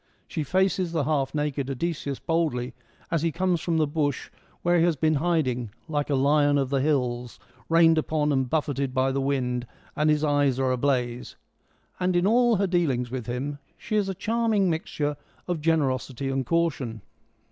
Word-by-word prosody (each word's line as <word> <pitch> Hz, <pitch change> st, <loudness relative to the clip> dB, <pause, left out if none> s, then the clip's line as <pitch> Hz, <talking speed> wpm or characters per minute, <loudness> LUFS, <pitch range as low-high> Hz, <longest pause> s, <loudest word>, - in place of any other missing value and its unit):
She -, -, -3 dB
faces 185 Hz, +2 st, +1 dB
the 160 Hz, -3 st, +1 dB
half 145 Hz, -1 st, 0 dB
naked 145 Hz, -2 st, -1 dB
Odysseus 140 Hz, -1 st, -3 dB
boldly, 155 Hz, -7 st, -1 dB, 0.4 s
as 165 Hz, -3 st, +1 dB
he 165 Hz, 0 st, +1 dB
comes 180 Hz, 0 st, 0 dB
from 170 Hz, -2 st, 0 dB
the 155 Hz, -, +3 dB
bush 145 Hz, -2 st, -2 dB, 0.3 s
where 175 Hz, 0 st, +3 dB
he -, -, +4 dB
has 170 Hz, -2 st, +3 dB
been 155 Hz, +2 st, +2 dB
hiding 130 Hz, -9 st, 0 dB
' -, -, -38 dB
like 150 Hz, -2 st, -2 dB
a 140 Hz, -, +2 dB
lion 145 Hz, +1 st, +3 dB
of 135 Hz, -1 st, -1 dB
the 135 Hz, -1 st, +2 dB
hills, 125 Hz, -4 st, -1 dB, 0.3 s
rained 165 Hz, -1 st, +5 dB
upon 150 Hz, -1 st, 0 dB
and 130 Hz, -2 st, +1 dB
buffeted 140 Hz, -3 st, -1 dB
by 130 Hz, +1 st, +2 dB
the 135 Hz, +1 st, -1 dB
wind, 125 Hz, -3 st, -1 dB, 0.3 s
and 150 Hz, +1 st, +2 dB
his 150 Hz, 0 st, +2 dB
eyes 145 Hz, -3 st, +2 dB
are 130 Hz, -1 st, +1 dB
ablaze,' 125 Hz, -2 st, -1 dB, 0.6 s
and 180 Hz, 0 st, +1 dB
in 175 Hz, +1 st, +3 dB
all 240 Hz, +2 st, +4 dB
her 200 Hz, 0 st, +1 dB
dealings 145 Hz, -10 st, 0 dB
with 125 Hz, -3 st, -4 dB
him 135 Hz, +4 st, -3 dB, 0.2 s
she 215 Hz, -, -4 dB
is 205 Hz, -2 st, +1 dB
a 190 Hz, -, -3 dB
charming 215 Hz, -2 st, +1 dB
mixture 150 Hz, -2 st, -2 dB, 0.3 s
of 175 Hz, -3 st, -2 dB
generosity 135 Hz, -4 st, 0 dB
and 135 Hz, -2 st, -2 dB
caution. 140 Hz, -, -1 dB
145 Hz, 180 wpm, -26 LUFS, 135-170 Hz, 0.6 s, rained